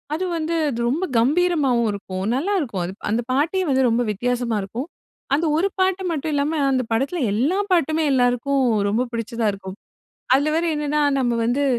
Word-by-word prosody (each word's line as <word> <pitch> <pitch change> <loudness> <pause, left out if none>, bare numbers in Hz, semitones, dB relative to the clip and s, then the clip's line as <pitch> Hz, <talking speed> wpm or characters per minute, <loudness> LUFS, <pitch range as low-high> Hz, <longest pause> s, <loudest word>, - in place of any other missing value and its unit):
அது 370 +4 -2
வந்து 330 +1 -2
அது 235 -3 -3
ரொம்ப 335 +9 0
கம்பீரமாவும் 275 -4 +2
இருக்கும். 190 -1 -5
நல்லா 345 +10 0
இருக்கும். 210 - -3
அது, 180 - -5 0.2
அந்த 230 +3 +1
பாட்டே 315 +8 +1
வந்து 265 -1 +3
ரொம்ப 230 +2 +1
வித்தியாசமா 240 +1 -1
இருக்கும். 235 +9 -5 0.5
அந்த 320 +4 0
ஒரு 360 +5 +2
பாட்டு 375 0 +1
மட்டும் 310 -1 -2
இல்லாம, 295 +2 0
அந்த 255 -1 +1
படத்துல 275 +8 -1
எல்லா 275 - +1 0.2
பாட்டுமே 320 -2 +2
எல்லாருக்கும் 255 +2 +2 0.3
ரொம்ப 225 +5 +1
பிடிச்சதா 230 0 -2
இருக்கும். 190 0 -9 0.6
அதுல 285 +3 +3
வேற 335 +1 +1
என்னன்னா 300 0 0 0.2
நம்ம 245 -2 +1
வந்து, 250 +5 +1
270 Hz, 170 wpm, -22 LUFS, 235-315 Hz, 0.6 s, வந்து